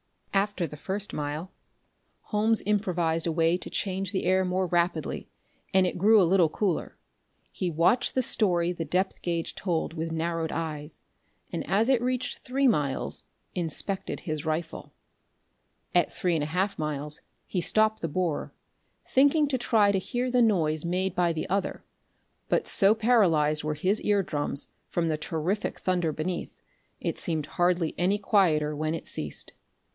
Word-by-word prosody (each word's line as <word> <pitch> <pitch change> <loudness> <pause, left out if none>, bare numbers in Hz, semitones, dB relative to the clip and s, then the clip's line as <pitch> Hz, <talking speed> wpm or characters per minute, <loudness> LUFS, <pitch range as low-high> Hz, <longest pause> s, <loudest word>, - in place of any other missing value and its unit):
After 200 -2 +1
the 150 -1 -8
first 195 +6 -3
mile 150 +5 -4 0.7
Holmes 220 +1 +1
improvised 175 -6 +1
a - - +1
way 165 +1 +2
to - - -8
change 195 -1 -2
the 190 - -2
air 185 +1 +3
more 185 +1 0
rapidly, 170 -3 -1 0.4
and 190 -1 +4
it 180 - -2
grew 215 +3 +6
a - - +6
little 175 -2 +4
cooler. 190 0 -2 0.5
He 185 - -2
watched 170 +10 +2
the 260 - +2
story 175 -7 +2
the 170 -2 -4
depth 180 +5 -1
gauge 170 -2 -2
told 170 -3 -2
with 165 0 -4
narrowed 165 0 -2
eyes, 155 -2 -5 0.5
and, - - -3
as 215 +4 +3
it 260 -3 +3
reached 255 0 -1
three 270 +2 +1
miles, 145 - +1 0.3
inspected 180 +3 0
his 155 -3 -4
rifle. 160 +1 -3 1.0
At - - +3
three 180 -3 -1
and 155 -3 0
a - - -2
half 185 +4 -1
miles 150 -1 -2 0.2
he 180 - -2
stopped 215 +3 +2
the 165 - -1
borer, 170 -1 -2 0.5
thinking 285 +3 +4
to 260 -3 0
try 220 -4 +3
to 195 - +1
hear 245 +6 -2
the 250 0 +3
noise 160 -9 +3
made 180 +2 -1
by 175 -2 +2
the 160 - -3
other, 195 +2 -2 0.7
but - - +1
so 200 +2 +5
paralyzed 170 -11 +3
were 155 0 -2
his 185 +8 0
ear 205 -1 +2
drums 145 -3 -2 0.2
from 170 -1 0
the 155 - 0
terrific 165 +6 -2
thunder 180 -3 0
beneath, 170 +4 -4 0.4
it - - -3
seemed 160 -3 -2
hardly 175 +1 +1
any 190 +3 +2
quieter 165 -8 +2
when 155 +2 -1
it 165 - -7
ceased. - - -4
180 Hz, 160 wpm, -27 LUFS, 160-200 Hz, 1.0 s, grew